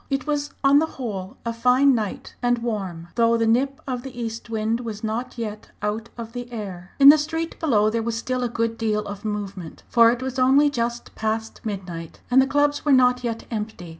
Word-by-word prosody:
It 275 -1 -1
was 290 -1 -1
on 275 +1 +6
the 320 - +1
whole 200 -7 -5
a 230 - -1
fine 250 +4 +4
night 215 -5 -3
and 245 0 +2
warm, 195 -8 -4
though 230 0 +3
the 230 - +1
nip 265 +5 +1
of 255 -2 -3
the 255 -1 -9
east 230 0 -5
wind 220 +1 0
was 225 -3 -6
not 230 +4 -3
yet 215 -2 -5
out 215 +2 -2
of 230 -1 -7
the 245 0 -6
air. 190 -5 -7
In 280 0 +9
the 305 +1 +8
street 325 +2 -3
below 215 -10 +3
there 230 +1 0
was 230 0 -2
still 255 +2 -2
a 245 - 0
good 230 -1 -2
deal 215 -2 0
of 200 0 -7
movement, 200 -5 -5
for 230 -1 +6
it 245 +2 -1
was 260 0 -3
only 275 +3 +5
just 235 -2 -3
past 220 0 -3
midnight 180 -6 -6
and 260 +2 +7
the 265 - +2
clubs 290 +1 +1
were 295 - +2
not 250 -1 +4
yet 230 -1 -3
empty. 210 -5 -5
230 Hz, 215 wpm, -23 LUFS, 215-255 Hz, -, In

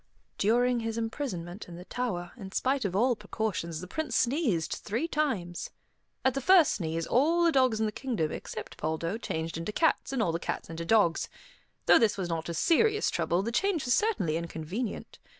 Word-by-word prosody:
During 245 +4 +3
his 225 0 -3
imprisonment 225 -6 -4
in 175 - -9
the 180 +1 -10
tower, 185 -9 -3
in 195 -6 -9
spite 265 -2 +1
of 185 -2 -2
all 240 +4 +3
precautions, 200 -6 -3
the 180 - -7
Prince 290 - -3
sneezed 235 - +1
three 235 +10 -1
times. 240 - -1 0.6
At 265 - +4
the 275 - -2
first 355 +2 +6
sneeze, 165 -3 -2
all 325 +7 +3
the 335 - +5
dogs 255 -6 +3
in 220 - +2
the 215 - -1
kingdom 210 - -2
except - - -7
Poldo 165 +6 -2
changed 165 -6 -3
into 165 +6 -3
cats, 320 +5 +1
and 270 - -1
all 210 -7 +2
the 165 - -2
cats 165 - -4
into 165 +1 -5
dogs. 190 -4 +3 0.6
Though - - +7
this 225 -3 +2
was 185 -3 -3
not 165 0 -3
a 170 - -3
serious 425 - +3
trouble, 170 +2 0
the 230 - -2
change 350 +3 +1
was 245 - +3
certainly 230 - +1
inconvenient. 170 +7 -5
220 Hz, 190 wpm, -29 LUFS, 170-260 Hz, 0.6 s, Though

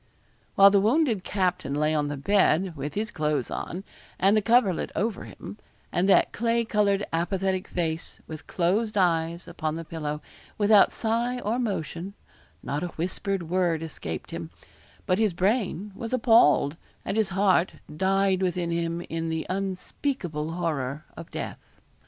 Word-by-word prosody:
While 195 0 +8
the 200 -1 +4
wounded 230 - +2
captain 180 -9 -1
lay 150 +1 +1
on 150 -1 +1
the 145 0 -4
bed, 185 +1 +2
with 145 0 -5
his 220 +2 -2
clothes 150 -5 -1
on, 180 +3 -4 0.4
and 195 +3 +4
the 215 - +4
coverlet 225 -5 +2
over 215 -1 -1
him, 210 - -10 0.3
and 185 +3 +1
that - - +5
clay 230 +1 +1
coloured 205 -2 +2
apathetic 185 +2 0
face, 165 -2 -3
with 155 -1 -9
closed 205 +5 0
eyes, 170 -1 +1
upon 160 -3 -3
the 165 0 -6
pillow, 150 -2 -4 0.4
without 205 -1 +6
sigh 235 +2 -1
or 225 +3 -1
motion, 195 -4 -3 0.5
not 140 +5 -2
a 180 - -1
whispered 185 +2 -2
word 170 -1 0
escaped 80 - -6
him; - - -5 0.6
but 185 +2 +1
his 215 -4 +2
brain 200 +1 0
was 230 +4 -6
appalled, 225 - +4 0.3
and - - -2
his 220 -3 +2
heart 190 -2 +2 0.2
died 190 +2 +2
within 180 -2 0
him 170 0 -1
in 165 -1 -4
the 160 0 -2
unspeakable 185 - -3
horror 150 -5 -2
of - - -9
death. - - -7
185 Hz, 150 wpm, -26 LUFS, 165-205 Hz, 0.6 s, While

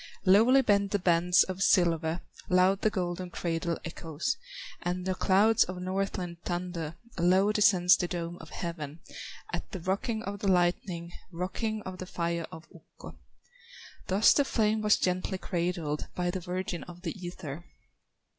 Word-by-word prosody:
Lowly 230 +8 +6
bend 200 -3 +3
the 205 - +1
bands 175 -1 +4
of 190 0 -5
silver, 170 -3 +3 0.3
Loud 185 +2 +4
the 215 - +3
golden 180 -2 -3
cradle 170 -1 -2
echoes, 165 - -3 0.5
And 180 +1 -2
the 190 - 0
clouds 210 +4 +4
of 180 0 -6
Northland 185 -2 -3
thunder, 175 -3 -3 0.2
Low 185 +4 +4
descends 185 -4 +5
the 175 - -1
dome 170 -1 -4
of - - -11
heaven, 165 -3 -6 0.5
At - - -4
the 190 - -4
rocking 200 +6 -2
of 200 -1 -5
the 200 - -2
lightning, 175 -1 +1 0.2
Rocking 210 +5 -3
of 185 -1 -7
the 185 - -6
fire 170 -2 -2
of 160 +1 -11
Ukko. - - -14 0.9
Thus 195 +3 +5
the 285 - +3
flame 220 -4 +1
was 210 0 +4
gently 185 +1 -1
cradled 170 -5 -2
By 175 0 0
the 185 - -3
virgin 180 0 -4
of 175 0 -12
the 165 - -3
ether. 175 -3 -6
180 Hz, 155 wpm, -29 LUFS, 170-195 Hz, 0.9 s, Lowly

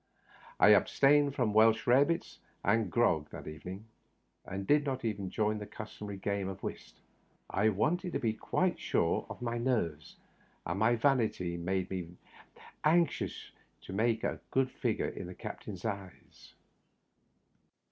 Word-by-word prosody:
I - - +7
abstained 140 +7 +5
from 115 -6 +1
Welsh 110 +1 +5
rare 130 +3 +6
bits 170 +1 -3 0.2
and 110 -5 +2
grog 80 -9 +2
that - - -9
evening, 90 +7 -8 0.6
and 95 +1 -5
did 150 +6 +4
not 130 -4 -3
even 100 -4 -2
join 105 +3 +1
in 110 - -2
the 105 - -7
custom 105 -1 -8
ary 100 -1 -5
game 100 0 -2
of 95 0 -8
whist. - - -6 0.6
I 105 +3 +3
wanted 170 - 0
to - - 0
be 110 -2 0
quite 110 - 0
sure - - 0
of - - -8
my 120 0 -2
nerves, 85 - -1 0.5
and 85 +4 -2
my 115 +3 +4
vanity 115 -9 +1
made 95 +2 -2
me 90 -2 -5 0.7
anxious 170 +2 +1 0.3
to - - -9
make 110 +2 +1
a - - -1
good 130 -1 +1
figure - - -1
in - - -7
the 90 - -8
captain's 95 +1 -7
eyes. 100 -4 -7
110 Hz, 155 wpm, -32 LUFS, 95-125 Hz, 0.7 s, I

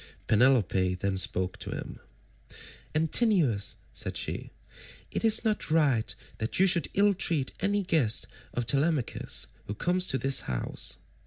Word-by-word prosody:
Penelope 105 -6 +2
then 95 +1 -2
spoke 95 -1 0
to - - -6
him. - - -7 1.0
"Antinous," 160 - +2 0.2
said - - -3
she, - - -4 0.6
"it - - -3
is 225 +1 +5
not 215 -5 0
right 145 -8 +1 0.2
that 110 +8 -2
you 190 - +6
should 175 -3 +2
ill 205 +1 +4
treat 160 -7 0
any 200 +1 0
guest 155 - +2 0.3
of 120 - -3
Telemachus 140 +1 0 0.2
who 105 - -4
comes 180 - +1
to 130 - +1
this 135 0 +3
house. 60 -2 -2
140 Hz, 140 wpm, -28 LUFS, 110-185 Hz, 1.0 s, you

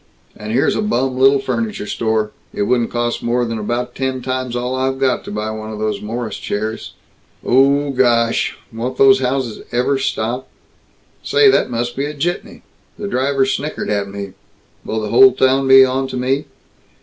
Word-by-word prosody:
And 105 0 -7
here's 125 +4 +2
a - - 0
bum 130 - 0
little 135 +2 +5
furniture 115 -6 -3
store 110 0 -1 0.2
it - - 0
wouldn't 120 +1 +1
cost 120 0 -2
more 120 +1 0
'n 115 -1 -3
about 120 +4 -3
ten 130 -1 -3
times 130 -1 -3
all 125 +1 -2
I've 130 0 -1
got 135 -1 0
to - - -7
buy 105 +1 -3
one 110 0 -6
of 110 - -6
those 110 0 -2
Morris 115 +2 -4
chairs. 110 +2 -4 0.5
Oh 140 +2 +3
Gooooooosh, 120 -3 +2 0.2
won't 125 +3 -4
these 135 -1 +6
houses 130 -3 -2
ever 125 +3 +1
stop? 125 0 -2 0.7
Say, 425 -2 +4
that - - +2
must 120 0 -3
be 140 - -1
a 150 +1 -5
jitney. 175 +5 -4 0.3
The 205 - -5
driver 135 -4 +1
snickered 145 -3 -3
at 100 -1 -1
me. 100 -1 -7 0.5
Will 110 0 -3
the 105 - -4
whole 200 - +7
town 135 +1 +2
be 135 0 +8
onto 130 0 -2
me? 135 +3 0
125 Hz, 175 wpm, -18 LUFS, 115-135 Hz, 0.7 s, be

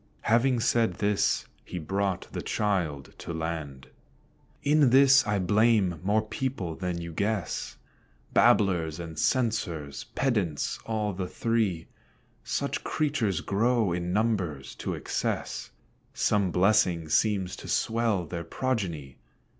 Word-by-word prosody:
Having 120 +1 +2
said 115 -1 +2
this, 105 -1 +1 0.2
he 90 - -7
brought 95 +3 -1
the - - -4
child 85 -10 -1
to - - -6
land. 80 -5 -4 0.8
In 145 -2 +4
this 135 0 +6
I 105 0 +1
blame 100 -2 +3
more 105 +3 +2
people 110 -7 -3
than 90 0 -3
you 85 0 -6
guess 100 +1 -2 0.6
Babblers 85 -6 +3
and 80 -2 -6
censors, 95 - -1
pedants, 100 - 0
all 105 -2 -1
the 90 0 -3
three; 110 -6 0 0.6
Such - - -2
creatures 120 - 0
grow 110 +1 +1
in 90 0 -2
numbers 95 -10 -1
to - - -3
excess, - - -3 0.5
Some 100 -3 +2
blessing 90 -3 +3
seems 95 +2 +1
to - - -9
swell 110 -5 +1
their 85 +1 -5
progeny. 85 - -3
100 Hz, 120 wpm, -28 LUFS, 85-115 Hz, 0.8 s, this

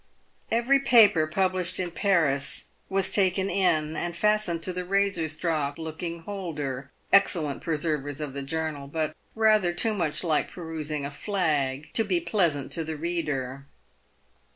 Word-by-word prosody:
Every 240 +5 +3
paper 215 -11 +6
published 185 +1 0
in 180 -2 -2
Paris 160 -8 +1 0.3
was 195 -1 +1
taken 190 -1 +1
in, 160 -5 +1
and 175 0 -3
fastened 210 -3 +1
to 185 - -1
the 180 0 -3
razor 195 -3 +1
strop 155 -3 -1
looking 165 +1 -5
holder 150 -9 -5
— - - -24
excellent 160 -7 +3
preservers 150 -3 -2
of 150 -3 -4
the 140 - -4
journal, 150 0 -3
but 155 +1 -2 0.2
rather 215 -5 +4
too 220 +5 +1
much 165 -5 0
like 160 -3 +1
perusing 155 -4 -4
a 140 - -5
flag, 150 -6 -1
to 225 - +3
be 185 -5 +1
pleasant 170 -9 0
to 165 - -1
the 160 0 -5
reader. 140 -5 -3
165 Hz, 150 wpm, -27 LUFS, 150-190 Hz, 0.3 s, paper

